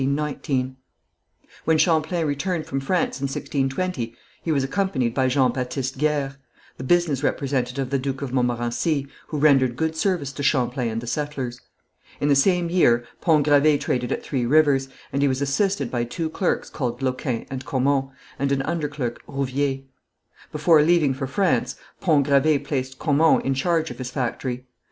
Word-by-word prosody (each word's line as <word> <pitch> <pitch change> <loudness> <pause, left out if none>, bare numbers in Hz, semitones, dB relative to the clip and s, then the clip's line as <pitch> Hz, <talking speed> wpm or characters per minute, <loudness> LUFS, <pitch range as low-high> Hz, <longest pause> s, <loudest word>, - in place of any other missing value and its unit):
When 160 -1 +3
Champlain 160 0 +2
returned 155 +3 -1
from 135 - -2
France 150 +1 -1
in - - 0
1620, 135 -2 -2 0.3
he 165 - -2
was 140 -3 +2
accompanied 135 - 0
by 130 0 +2
Jean 130 -1 +3
Baptiste 130 +1 -3
Guers, 145 -2 0 0.4
the - - -6
business 160 -2 +2
representative 135 -2 -1
of 130 - -7
the 140 - +1
Duke 135 +1 -3
of 130 -2 -5
Montmorency, 125 +4 0 0.2
who 155 - -4
rendered 135 -4 +4
good 160 +4 -1
service 160 -5 0
to 140 - -7
Champlain 125 -3 +1
and 115 +1 -3
the - - -7
settlers. 130 -1 -3 0.6
In 145 - +1
the 140 - +5
same 175 +5 +3
year 120 -10 +3 0.2
Pont 155 -5 +3
Gravé 145 0 +4
traded 125 -1 -1
at - - -2
Three 130 -4 -2
Rivers, 140 -2 +3 0.2
and 140 - 0
he 140 - +4
was 130 -1 0
assisted 140 - 0
by 120 -2 0
two 160 +7 -3
clerks 180 - -1
called 125 -2 -3
Loquin 130 -2 -2
and 130 -1 -4
Caumont, 135 +2 +1 0.3
and 140 +1 0
an 135 -1 +1
underclerk, 145 -7 -2
Rouvier. 135 0 -1 0.7
Before 150 +1 +4
leaving 155 -3 +3
for 135 0 -4
France, 130 -5 +1 0.2
Pont 150 -6 +3
Gravé 140 +1 +3
placed 130 -2 -3
Caumont 155 +1 +3
in 135 - +1
charge 160 +4 0
of - - -10
his 130 -1 -4
factory. 125 -1 -3
140 Hz, 165 wpm, -23 LUFS, 130-155 Hz, 0.7 s, the